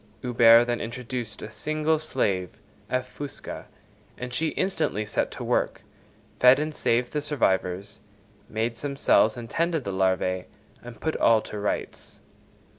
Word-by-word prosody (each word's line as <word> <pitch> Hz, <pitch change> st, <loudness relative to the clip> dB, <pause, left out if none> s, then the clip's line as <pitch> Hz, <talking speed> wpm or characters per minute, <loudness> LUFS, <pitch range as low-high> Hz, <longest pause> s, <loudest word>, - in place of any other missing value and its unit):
Huber 120 Hz, -1 st, +6 dB
then 120 Hz, -1 st, -1 dB
introduced 120 Hz, -1 st, -5 dB
a 110 Hz, -, -7 dB
single 155 Hz, +4 st, 0 dB
slave 95 Hz, -, 0 dB, 0.4 s
(F. 130 Hz, 0 st, -1 dB
fusca), 145 Hz, -1 st, -7 dB, 0.5 s
and 125 Hz, 0 st, -6 dB
she 160 Hz, +6 st, +1 dB
instantly 160 Hz, -, -1 dB
set 105 Hz, -, -1 dB
to -, -, -7 dB
work, -, -, 0 dB, 0.6 s
fed 125 Hz, +1 st, +7 dB
and 155 Hz, +1 st, -2 dB
saved 120 Hz, -3 st, 0 dB
the 150 Hz, -, 0 dB
survivors; 100 Hz, -8 st, 0 dB, 0.5 s
made 115 Hz, +1 st, -2 dB
some 140 Hz, +1 st, -4 dB
cells 110 Hz, -4 st, +4 dB
and 120 Hz, -1 st, -6 dB
tended 165 Hz, +3 st, 0 dB
the 100 Hz, -, -3 dB
larvæ, 95 Hz, -1 st, +1 dB, 0.4 s
and 120 Hz, -2 st, -11 dB
put 160 Hz, -, -2 dB
all 115 Hz, -1 st, +5 dB
to 105 Hz, -, -7 dB
rights. 105 Hz, -, -4 dB
120 Hz, 145 wpm, -26 LUFS, 105-145 Hz, 0.6 s, fed